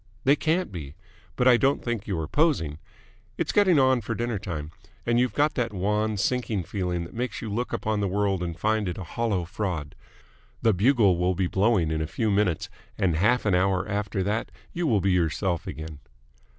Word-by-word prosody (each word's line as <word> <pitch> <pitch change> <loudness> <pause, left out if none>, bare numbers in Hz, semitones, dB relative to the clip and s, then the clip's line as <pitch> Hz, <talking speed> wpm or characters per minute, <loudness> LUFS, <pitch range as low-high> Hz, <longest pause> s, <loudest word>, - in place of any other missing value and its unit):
"They 140 +2 +5
can't 165 - 0
be. 75 -6 -7 0.4
But 125 - +2
I 125 -2 +7
don't 135 +2 +1
think 120 -3 -3
you 95 -4 -1
are 80 -1 -3
posing. 85 - +1 0.6
It's - - -1
getting 190 -5 +4
on 130 -2 +4
for 115 +2 -3
dinner 120 -2 -2
time, 80 -6 -5 0.3
and 120 0 +2
you've 125 0 +1
got 150 +1 +2
that 115 -3 -2
wan, 105 +3 0
sinking 110 -2 0
feeling 90 -1 -2
that 85 - -10
makes 125 +2 -3
you 110 -3 -5
look 120 +3 -2
upon 110 -1 -1
the 100 - 0
world 100 -1 0
and 85 -2 -4
find 110 0 +1
it 85 - -5
a 95 - -5
hollow 100 -3 -1
fraud. 85 -6 -4 0.7
The 110 - +4
bugle 100 -3 +3
will 90 +1 +1
be 95 - 0
blowing 95 -3 +2
in 80 0 -1
a 80 - -2
few 110 +5 -1
minutes, 100 -5 +1 0.3
and 90 -4 +1
half 110 +9 +2
an 105 - +2
hour 95 +1 +2
after 100 -1 -2
that 105 +2 -1 0.2
you 170 -1 -1
will 110 -7 +3
be 95 +1 +2
yourself 85 0 0
again." 80 -2 -7
100 Hz, 205 wpm, -26 LUFS, 90-120 Hz, 0.7 s, I